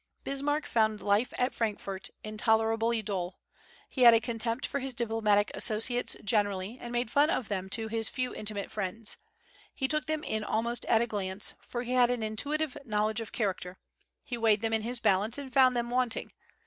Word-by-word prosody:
Bismarck 290 +2 -1
found 220 -4 +2
life 205 +5 +2
at 250 +1 +1
Frankfort 200 -4 -3
intolerably 225 +1 +1
dull. 185 -3 -3 0.5
He 260 - -4
had 235 -2 +9
a - - +5
contempt 230 +2 -2
for 280 - -2
his 265 -1 -4
diplomatic 220 -3 +2
associates 235 +3 0
generally, 205 +1 0
and 240 - -6
made 240 -1 -1
fun 290 +4 +4
of 240 - -1
them 190 -2 -2
to 220 +3 0
his 225 0 -1
few 255 -1 -2
intimate 205 -2 -4
friends. 210 +2 -3 0.6
He 265 - 0
took 305 -1 -1
them 310 0 -1
in 220 -6 -2
almost 235 +3 -1
at 225 -1 +4
a - - +2
glance, 200 -3 -2
for 240 0 -4
he 245 - -5
had 250 -1 +5
an 245 -2 -1
intuitive 285 +7 -2
knowledge 215 -1 0
of 225 - -7
character; 185 -4 -2 0.5
he 240 -2 -5
weighed 220 -2 +3
them 225 0 0
in 220 - +2
his 240 +2 -3
balance, 210 +4 +2
and 275 -3 -7
found 255 -1 +6
them 240 0 -1
wanting. 250 -2 0
225 Hz, 185 wpm, -30 LUFS, 210-245 Hz, 0.6 s, had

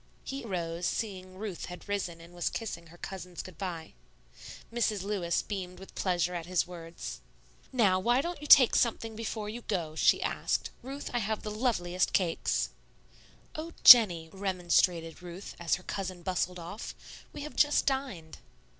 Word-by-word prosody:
He 275 0 -5
arose, 175 -4 -2
seeing 185 -4 -4
Ruth 200 -3 -5
had 180 +2 -10
risen 190 -5 -2
and 170 +1 -14
was 175 -1 -1
kissing 170 -7 -5
her 170 +2 -15
cousins 180 -1 -7
good 185 -4 -12
by. 170 -5 -5 0.8
Mrs. 215 -4 0
Lewis 195 -4 0
beamed 185 -3 -5
with 190 +1 -12
pleasure 180 -2 0
at 170 -1 -4
his 180 -1 +1
words. 170 -1 -8 0.5
"Now, 205 -8 +3
won't 270 - +1
you 295 - -6
take 260 -4 +9
something 225 -1 +1
before 220 -1 -4
you 225 +3 -6
go?" 170 -9 -2
she - - +4
asked. - - -1
"Ruth, 275 +3 -6
I 240 - +1
have 220 0 -2
the 210 - -4
loveliest 185 -6 0
cakes." 175 -4 +1 0.8
"Oh, 325 +2 -6
Jennie," 175 -10 +9
remonstrated 180 -3 +1
Ruth, 180 +2 -8
as 170 -2 +1
her 180 - -11
cousin 185 -3 -5
bustled 180 -1 -1
off, 175 +5 -7 0.4
"we - - -8
have 300 - -8
just 295 0 +4
dined." 255 - -2
185 Hz, 160 wpm, -30 LUFS, 175-225 Hz, 0.8 s, take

